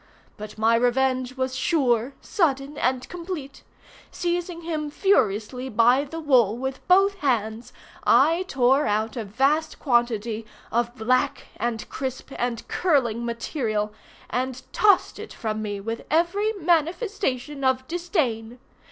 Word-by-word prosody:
But 210 Hz, 0 st, -9 dB
my 220 Hz, +1 st, +3 dB
revenge 255 Hz, +1 st, +1 dB
was 260 Hz, 0 st, -1 dB
sure, 255 Hz, -4 st, +1 dB
sudden, 285 Hz, -6 st, 0 dB
and 255 Hz, -2 st, 0 dB
complete. 335 Hz, -6 st, -7 dB, 0.5 s
Seizing 350 Hz, 0 st, -2 dB
him 310 Hz, -3 st, -3 dB
furiously 250 Hz, -, +1 dB
by 245 Hz, +5 st, +4 dB
the 325 Hz, +3 st, -7 dB
wool 245 Hz, -8 st, +3 dB
with 265 Hz, +1 st, -4 dB
both 390 Hz, +2 st, +5 dB
hands, 230 Hz, -, -1 dB, 0.3 s
I 335 Hz, +3 st, +4 dB
tore 270 Hz, -1 st, +3 dB
out 215 Hz, +1 st, 0 dB
a 235 Hz, -, -3 dB
vast 275 Hz, +10 st, +1 dB
quantity 235 Hz, -3 st, 0 dB, 0.3 s
of 240 Hz, +1 st, 0 dB
black, 255 Hz, +2 st, 0 dB
and 230 Hz, -2 st, -2 dB
crisp, 265 Hz, 0 st, -5 dB
and 240 Hz, -2 st, -2 dB
curling 240 Hz, -10 st, +1 dB
material, 230 Hz, -3 st, -2 dB, 0.3 s
and 255 Hz, 0 st, -3 dB
tossed 410 Hz, -3 st, +3 dB
it -, -, -8 dB
from 215 Hz, -1 st, -3 dB
me 205 Hz, -2 st, -3 dB
with 225 Hz, +3 st, -5 dB
every 350 Hz, +7 st, +2 dB
manifestation 335 Hz, -, -1 dB
of 260 Hz, 0 st, +1 dB
disdain. 265 Hz, -, -2 dB
260 Hz, 125 wpm, -24 LUFS, 230-315 Hz, 0.5 s, both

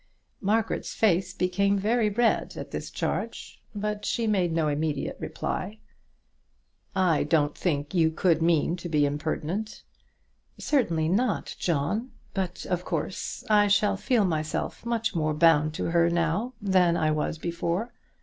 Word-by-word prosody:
Margaret's 215 Hz, +2 st, 0 dB
face 185 Hz, -3 st, +2 dB
became 200 Hz, +3 st, +1 dB
very 215 Hz, +2 st, +2 dB
red 230 Hz, +3 st, +1 dB
at -, -, -7 dB
this -, -, -5 dB
charge, -, -, -4 dB
but 210 Hz, 0 st, -3 dB
she 235 Hz, -, -1 dB
made 190 Hz, -6 st, +1 dB
no 160 Hz, -1 st, +1 dB
immediate 150 Hz, +1 st, -1 dB
reply. 215 Hz, -, -4 dB, 1.2 s
"I 180 Hz, -5 st, +3 dB
don't 150 Hz, -1 st, +1 dB
think 145 Hz, -4 st, -2 dB
you 165 Hz, -3 st, +4 dB
could 165 Hz, 0 st, +1 dB
mean 165 Hz, 0 st, +2 dB
to 175 Hz, 0 st, -6 dB
be 150 Hz, -2 st, +3 dB
impertinent." 160 Hz, +8 st, -3 dB, 0.7 s
"Certainly 170 Hz, -, +1 dB
not, 215 Hz, +4 st, 0 dB
John; 175 Hz, -, -1 dB, 0.2 s
but, 185 Hz, -2 st, -3 dB
of 180 Hz, -1 st, -1 dB
course, 165 Hz, +1 st, -4 dB
I 210 Hz, -1 st, +5 dB
shall 205 Hz, 0 st, +3 dB
feel 220 Hz, +1 st, +2 dB
myself 155 Hz, +6 st, -2 dB
much 230 Hz, -2 st, 0 dB
more 155 Hz, -3 st, 0 dB
bound 155 Hz, -1 st, +4 dB
to -, -, -2 dB
her 170 Hz, 0 st, +4 dB
now 170 Hz, +8 st, 0 dB
than 185 Hz, -4 st, +3 dB
I 155 Hz, -1 st, +2 dB
was 155 Hz, +1 st, -1 dB
before." 170 Hz, +7 st, -2 dB
180 Hz, 140 wpm, -27 LUFS, 160-210 Hz, 1.2 s, I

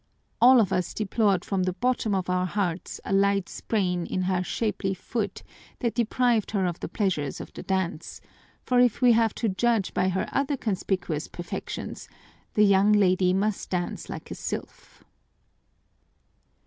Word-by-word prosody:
All 255 Hz, +1 st, +8 dB
of 205 Hz, -5 st, +2 dB
us 180 Hz, -, -1 dB
deplored 205 Hz, -3 st, +1 dB
from 195 Hz, -2 st, -1 dB
the 185 Hz, 0 st, 0 dB
bottom 240 Hz, -1 st, 0 dB
of 185 Hz, -2 st, -1 dB
our 180 Hz, 0 st, +1 dB
hearts 180 Hz, -3 st, -2 dB
a -, -, -2 dB
light 195 Hz, -1 st, +2 dB
sprain 180 Hz, -5 st, -1 dB
in 185 Hz, -, -1 dB
her 185 Hz, 0 st, +1 dB
shapely 200 Hz, -1 st, -2 dB
foot 205 Hz, +1 st, -4 dB, 0.3 s
that 235 Hz, -3 st, -1 dB
deprived 235 Hz, -1 st, +1 dB
her 195 Hz, -3 st, 0 dB
of 175 Hz, -1 st, -2 dB
the -, -, -4 dB
pleasures 175 Hz, -, -1 dB
of -, -, -9 dB
the -, -, -7 dB
dance, 185 Hz, -4 st, -3 dB, 0.4 s
for 250 Hz, -1 st, +2 dB
if 245 Hz, 0 st, +3 dB
we 245 Hz, -, +7 dB
have 225 Hz, -2 st, +3 dB
to 230 Hz, -, -1 dB
judge 220 Hz, 0 st, +1 dB
by 185 Hz, +1 st, +1 dB
her 190 Hz, 0 st, -1 dB
other 280 Hz, +1 st, 0 dB
conspicuous 185 Hz, -, -2 dB
perfections, 175 Hz, -, -6 dB, 0.5 s
the 210 Hz, -, +6 dB
young 200 Hz, +1 st, +5 dB
lady 185 Hz, -3 st, +4 dB
must 195 Hz, +2 st, -1 dB
dance 175 Hz, -1 st, -3 dB
like -, -, -7 dB
a -, -, -2 dB
sylph. -, -, -7 dB
195 Hz, 160 wpm, -26 LUFS, 185-225 Hz, 0.5 s, All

